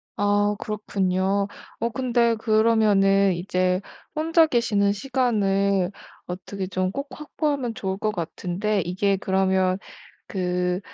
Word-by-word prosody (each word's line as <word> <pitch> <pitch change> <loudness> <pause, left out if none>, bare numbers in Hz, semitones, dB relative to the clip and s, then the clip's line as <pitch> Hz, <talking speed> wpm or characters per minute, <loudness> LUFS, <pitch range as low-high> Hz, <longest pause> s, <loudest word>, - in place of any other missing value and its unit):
아 205 0 +2
그렇군요. 195 -2 -1 0.3
어 235 - 0
근데 240 -2 +1
그러면은 215 -3 +3
이제 180 +1 0 0.3
혼자 325 +1 +4
계시는 225 -6 +2
시간을 200 -5 +1 0.3
어떻게 190 +2 -5
좀 185 -1 -1
꼭 280 +6 -4
확보하면 285 -3 -2
좋을 190 -2 -3
것 215 +1 -1
같은데 190 +3 -2
이게 190 +3 0
그러면 190 -1 +1 0.5
그 180 -1 -1
200 Hz, 235 characters per minute, -24 LUFS, 190-225 Hz, 0.5 s, 혼자